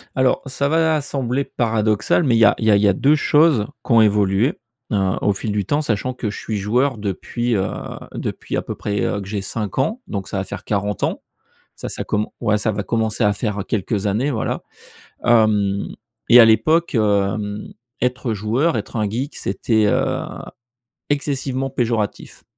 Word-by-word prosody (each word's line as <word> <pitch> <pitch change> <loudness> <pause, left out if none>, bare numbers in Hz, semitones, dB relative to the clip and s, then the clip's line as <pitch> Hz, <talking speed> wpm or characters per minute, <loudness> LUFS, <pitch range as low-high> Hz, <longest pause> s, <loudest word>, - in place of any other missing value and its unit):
Alors, 130 -1 +2
ça 140 +1 -1
va 160 -1 +2
sembler 135 -1 -2
paradoxal 110 +4 +1
mais 125 -5 +3
il - - +3
y 115 - +7
a - - +6
il 110 - -2
y 110 - +5
a - - +6
il 100 - +3
y 105 - +5
a 100 - +4
2 145 +9 +3
choses 150 -6 +3 0.2
qui - - -5
ont 115 - +7
évolué, 105 - +3 0.4
heu, - - +1 0.3
au 105 - +2
fil 105 +2 -4
du 100 -1 -1
temps 145 +9 +1
sachant 130 -1 -1
que 115 -4 -3
je - - -6
suis 110 - -3
joueur 120 +4 0
depuis, 115 +4 -2
heu, 95 - +1 0.5
depuis - - -4
à - - 0
peu - - -6
près, 105 -1 -2
heu, 100 - 0
que 95 - -8
j'ai 100 -1 -3
5 105 +3 -3
ans, 220 - 0
donc 100 -3 -5
ça 100 - -4
va 95 - -1
faire - - -8
40 105 -1 -2
ans, - - -1 0.5
ça - - -6
ça - - -4
com 105 0 -1 0.2
ouais, 105 0 +2
ça 110 +1 0
va 105 0 -2
commencer 110 +1 -1
à 105 - +3
faire 105 -1 -3
quelques 105 -1 -1
années, 120 +9 0
voilà. 110 - -2 0.6
Hem, 105 -4 +3 0.4
et 120 - +8
à 120 - +10
l'époque, 155 +10 +3
hem, 105 -1 0 0.3
être 125 -1 -1
joueur, 115 - 0
être - - -5
un 110 -3 0
geek 130 +7 -3
c'était, 105 +2 0
heu, - - +1 0.9
excessivement 135 -2 -1
péjoratif, 115 -5 -2
110 Hz, 195 wpm, -20 LUFS, 105-130 Hz, 0.9 s, à